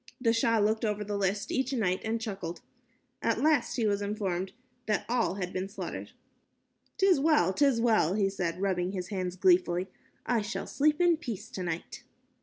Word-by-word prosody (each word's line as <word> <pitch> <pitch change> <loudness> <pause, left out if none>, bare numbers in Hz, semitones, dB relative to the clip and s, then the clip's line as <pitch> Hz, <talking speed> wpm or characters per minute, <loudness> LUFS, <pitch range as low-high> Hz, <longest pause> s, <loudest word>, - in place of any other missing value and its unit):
The 230 -3 +2
Shah 230 0 +2
looked 215 +1 +1
over 210 -1 0
the 205 0 -4
list 200 0 -1
each 265 +1 0
night 195 -7 0
and 225 +1 -1
chuckled. 190 -6 -5 0.6
At 230 -1 +1
last 290 -3 +2
he 235 - 0
was 205 -1 +1
informed 195 -3 -2 0.4
that 210 -2 0
all 235 -5 +1
had 180 -2 -4
been 185 +1 -3
slaughtered. 200 - -6 0.8
"'Tis 385 -6 +4
well, 280 - +3
'tis 275 0 +3
well," 220 -7 +3
he 205 -2 +2
said, 180 -3 -3
rubbing 185 -1 0
his 180 -2 -4
hands, 185 -3 -3
gleefully, 180 0 +3 0.4
"I 240 -3 +1
shall 210 +3 -4
sleep 300 +2 +1
in 345 -2 +4
peace 225 - -6
tonight." 175 -3 -5
205 Hz, 175 wpm, -29 LUFS, 185-235 Hz, 0.8 s, Tis